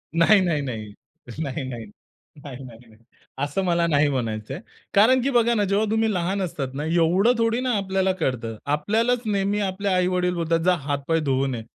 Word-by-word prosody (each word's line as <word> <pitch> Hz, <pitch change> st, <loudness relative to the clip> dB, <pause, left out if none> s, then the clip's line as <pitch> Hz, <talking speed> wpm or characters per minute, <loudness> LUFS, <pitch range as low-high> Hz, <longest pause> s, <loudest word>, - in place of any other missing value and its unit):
नाही, 180 Hz, +5 st, +5 dB
नाही, 170 Hz, -5 st, 0 dB
नाही. 115 Hz, -6 st, -5 dB, 0.5 s
नाही, 140 Hz, -2 st, -3 dB
नाही. 115 Hz, -3 st, -7 dB, 0.6 s
नाही, 135 Hz, -2 st, -9 dB
नाही, 115 Hz, -3 st, -12 dB
नाही. 110 Hz, +1 st, -22 dB, 0.4 s
असं 145 Hz, +6 st, -1 dB
मला 170 Hz, -1 st, +2 dB
नाही 145 Hz, -2 st, +3 dB
म्हणायचंय. 120 Hz, +1 st, -3 dB, 0.3 s
कारण 245 Hz, +6 st, +5 dB
की 270 Hz, -, 0 dB
बघा 235 Hz, -1 st, +3 dB
ना 205 Hz, -, +2 dB
जेव्हा 200 Hz, +3 st, +1 dB
तुम्ही 220 Hz, 0 st, +1 dB
लहान 185 Hz, +3 st, -1 dB
असतात 140 Hz, -7 st, -4 dB
ना, 145 Hz, +2 st, -4 dB
एवढं 175 Hz, +8 st, +3 dB
थोडी 230 Hz, +1 st, +1 dB
ना 255 Hz, -1 st, 0 dB
आपल्याला 190 Hz, -1 st, 0 dB
कळतं. 115 Hz, -5 st, -2 dB
आपल्यालाच 220 Hz, +12 st, +1 dB
नेहमी 200 Hz, -1 st, 0 dB
आपले 200 Hz, 0 st, -2 dB
आई-वडील 180 Hz, -1 st, +1 dB
बोलतात, 165 Hz, -1 st, 0 dB
जा 180 Hz, -, +5 dB
हात-पाय 145 Hz, +3 st, 0 dB
धुवून 135 Hz, -3 st, 0 dB
ये. 115 Hz, -, -6 dB
170 Hz, 180 wpm, -23 LUFS, 140-200 Hz, 0.6 s, नाही